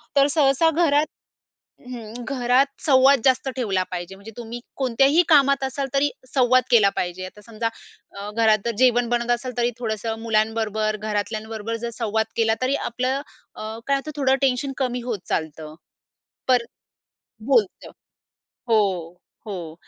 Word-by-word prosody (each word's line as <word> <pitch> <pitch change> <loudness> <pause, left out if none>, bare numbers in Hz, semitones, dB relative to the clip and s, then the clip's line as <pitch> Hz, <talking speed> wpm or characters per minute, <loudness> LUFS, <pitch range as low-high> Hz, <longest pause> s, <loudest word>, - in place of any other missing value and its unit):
तर 280 0 +5
सहसा 285 +2 +4
घरात 305 -2 +3 0.8
हं, 230 -3 -8
घरात 255 +1 +2 0.2
संवाद 270 -1 +5
जास्त 260 0 +3
ठेवला 205 -8 0
पाहिजे. 180 +1 -5
म्हणजे 200 +3 -12
तुम्ही 235 0 -6 0.2
कोणत्याही 270 +5 +3
कामात 275 -3 +5
असाल, 270 +1 -2
तरी 280 +1 +3 0.2
संवाद 255 -1 +4
केला 215 -5 +6
पाहिजे. 180 +1 -3
आता 200 +3 -12
समजा, 230 0 -3 0.5
अ, 200 +1 -5
घरात 220 -1 +4
जर 235 - +1
जेवण 245 -1 +3
बनत 240 0 0
असल, 240 +1 -1
तरी 240 0 +1
थोडंसं 220 -1 -3
मुलांबरोबर, 220 -1 0
घरातल्यांबरोबर 215 +1 -3
जर 235 - -1
संवाद 220 -1 0
केला, 225 -1 +2
तरी 260 +2 +1
आपलं 255 +2 -2 0.3
अ, 220 +1 -6
काय 280 - +3
होतं, 305 +3 -6
थोडं 270 -2 +2
टेन्शन 270 0 +1
कमी 250 -2 -1
होत 235 -5 -3
चालतं. 155 -1 -3 0.7
पण 250 -2 +4 0.8
बोलतं 235 -8 +1 0.8
हो, 225 -2 +5 0.7
हो. 175 -6 -6
235 Hz, 140 wpm, -23 LUFS, 215-265 Hz, 0.8 s, केला